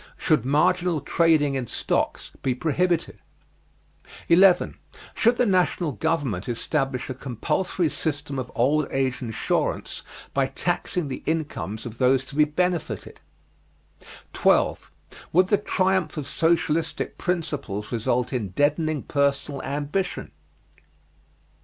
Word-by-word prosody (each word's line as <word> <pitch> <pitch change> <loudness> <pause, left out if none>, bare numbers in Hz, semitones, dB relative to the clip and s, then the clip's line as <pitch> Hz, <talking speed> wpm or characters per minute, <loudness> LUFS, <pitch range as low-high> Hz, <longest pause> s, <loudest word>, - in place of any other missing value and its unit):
Should 150 -7 +2
marginal 175 +4 +2
trading 150 -1 +3
in 130 -3 -2
stocks - - -1
be 130 -2 0
prohibited? 170 +5 0 1.1
11. 180 +2 +5 0.3
Should 235 +1 +3
the 250 - +3
national 180 -5 +2
government 135 - -1
establish 135 +1 -1
a 130 - -3
compulsory 135 - -1
system 145 -3 -3
of 130 -1 -5
old 140 +4 +2
age 130 -1 -1
insurance 115 -3 -2 0.3
by - - +2
taxing 175 -5 -2
the 130 - -5
incomes 150 -9 -3
of 115 -1 -8
those 130 0 +3
to 140 - -10
be 150 0 +5
benefited? 175 +2 -2 1.1
12. - - +2 0.4
Would 185 +3 +4
the 205 - +4
triumph 185 -5 0
of 150 - -3
socialistic 165 +1 0
principles 145 - -3
result 120 +2 0
in 115 -6 -2
deadening 150 - +1
personal 140 0 0
ambition? 145 +7 -3
150 Hz, 115 wpm, -25 LUFS, 130-170 Hz, 1.1 s, 11